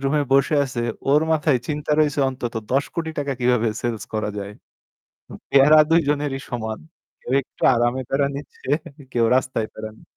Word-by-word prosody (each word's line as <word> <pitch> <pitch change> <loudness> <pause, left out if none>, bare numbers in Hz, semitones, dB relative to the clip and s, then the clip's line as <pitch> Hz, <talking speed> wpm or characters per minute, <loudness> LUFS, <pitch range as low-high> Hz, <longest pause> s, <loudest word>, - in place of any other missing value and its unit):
room-এ 145 +2 +2
বসে 140 +3 +3
আছে 125 -3 -4 0.3
ওর 150 +2 +5
মাথায় 150 -4 +2
চিন্তা 150 0 -3
রয়েছে 150 -2 +2
অন্তত 125 -2 -5 0.2
৳১০,০০,০০,০০০ 160 +4 -1
টাকা 140 -1 -1
কীভাবে 125 -2 +2
sales 115 -4 -3
করা 110 -1 -1
যায়।" 100 0 -6 1.0
প্যারা 145 +3 +7
২ 165 +1 +5
জনেরই 145 -2 -1
সমান। 110 -3 -4 0.4
কেউ 125 - -6
একটু - - -22
আরামে 120 +2 +1
প্যারা 140 +1 +1
নিচ্ছে, 140 -1 -10 0.4
কেউ 120 -1 +2
রাস্তায় 130 -4 -1
প্যারা 110 0 -7
নি - - -19
135 Hz, 160 wpm, -22 LUFS, 120-145 Hz, 1.0 s, প্যারা